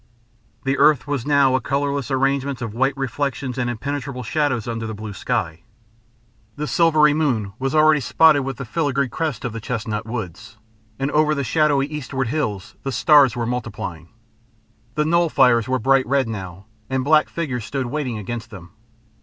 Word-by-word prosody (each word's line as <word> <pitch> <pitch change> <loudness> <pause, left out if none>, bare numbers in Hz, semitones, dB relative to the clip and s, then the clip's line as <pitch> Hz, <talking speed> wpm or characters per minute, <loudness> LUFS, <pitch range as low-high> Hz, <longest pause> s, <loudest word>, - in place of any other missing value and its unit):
The 135 +1 0
earth 150 -2 +4
was 145 -3 -3
now 140 -3 +4
a 130 - +1
colourless 140 +2 -1
arrangement 135 0 0
of 115 -4 -5
white 135 +3 0
reflections 135 -1 -3
and 120 -1 0
impenetrable 130 +1 -4
shadows, 130 -3 -1
under 115 -1 -3
the 110 - -5
blue 105 0 -7
sky. 80 -3 -2 0.9
The 150 - -3
silvery 155 -2 +4
moon 125 -10 0
was 135 +2 -1
already 155 0 +5
spotted 150 +2 +4
with 135 -2 -4
the 135 - -6
filigree 140 0 0
crests 150 -7 -3
of 120 - -3
the 115 - -6
chestnut 110 -1 -4
woods, 110 -1 -6 0.4
and 135 +2 -2
over 155 0 +3
the 140 - -1
shadowy 145 -1 +2
eastward 135 -4 -4
hills 110 -10 -3
the 135 - -3
stars 140 +1 +5
were 120 -1 -2
multiplying. 110 -9 -5 0.9
The 150 - +1
knoll 170 +1 +2
fires 125 -6 +4
were 130 0 +1
bright 135 +2 +2
red 135 -1 +1
now, 95 -3 -7 0.2
and 130 0 -1
black 155 +2 +4
figures 135 -9 -3
stood 135 -2 -3
waiting 130 -3 -3
against 115 +2 -6
them. 90 -6 -12
130 Hz, 170 wpm, -21 LUFS, 115-145 Hz, 0.9 s, already